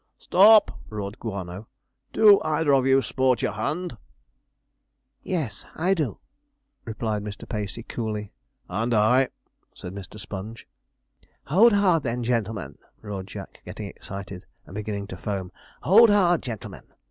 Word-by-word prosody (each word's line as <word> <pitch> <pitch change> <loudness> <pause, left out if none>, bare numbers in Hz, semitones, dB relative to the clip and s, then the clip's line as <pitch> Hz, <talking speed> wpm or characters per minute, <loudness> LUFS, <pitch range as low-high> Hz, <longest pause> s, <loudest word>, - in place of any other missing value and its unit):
'Stop!' 210 +2 +5
roared 105 0 -6
Guano, 100 -1 -6 0.4
'do 210 -2 +6
either 155 -1 +1
of 135 -1 +3
you 135 0 +4
sport 130 +1 +1
your - - +1
hand?' 175 -2 -3 1.3
'Yes, 150 - -3
I 180 +4 +2
do,' 150 - -2 0.7
replied 110 -2 -3
Mr. 100 -2 -8
Pacey 105 0 -4
coolly. 105 -4 -4 0.4
'And 115 +6 -1
I,' 125 +5 +4 0.5
said 90 - -8
Mr. 100 +1 -9
Sponge. 105 +3 -8 0.8
'Hold 205 +10 +5
hard, 190 -5 +3
then, 120 -2 -2
gen'lemen!' 110 - -2 0.2
roared 100 -3 -6
Jack, - - -10
getting - - -7
excited, 95 -1 -9 0.2
and 90 - -13
beginning 105 -1 -4
to 90 - -8
foam. 95 -1 -4 0.3
'Hold 225 +5 +7
hard, 180 -5 +4
gen'lemen!' 115 -6 -7
115 Hz, 130 wpm, -25 LUFS, 100-155 Hz, 1.3 s, Hold